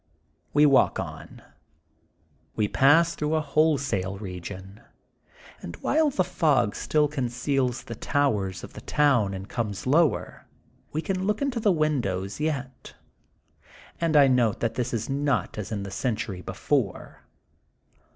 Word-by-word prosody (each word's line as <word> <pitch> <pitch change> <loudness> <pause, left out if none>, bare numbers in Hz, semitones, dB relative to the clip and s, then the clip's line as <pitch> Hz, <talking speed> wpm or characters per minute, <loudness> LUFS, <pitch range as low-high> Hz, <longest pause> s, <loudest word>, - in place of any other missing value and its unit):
We 150 +1 +5
walk 140 -2 +4
on. - - -8 1.1
We 105 - +1
pass 160 +9 +4
through 150 +1 -1
a - - +2
wholesale 140 -11 0
region, 95 0 -8 0.8
and 85 - -7
while 310 - +2
the 195 -9 +1
fog 135 -12 +1
still 150 -1 +1
conceals 130 -2 -1
the 115 - -7
towers 105 -8 -1
of - - -10
the - - -9
town 120 -10 +2
and 95 +1 -7
comes 105 -4 -4
lower, 155 +3 +1 0.4
we 155 +2 -2
can 190 0 -2
look 210 0 0
into 275 -4 -1
the 215 -2 +3
windows 120 - -1
yet, 140 -4 -4 1.0
and 165 -2 +2
I 145 - +8
note 125 -5 +2
that 115 - 0
this 125 0 -2
is 115 -2 -2
not 140 -4 -1
as 105 - -6
in 100 -2 -3
the 100 - -7
century 105 -4 -3
before. 100 +3 -2
130 Hz, 140 wpm, -26 LUFS, 105-150 Hz, 1.1 s, I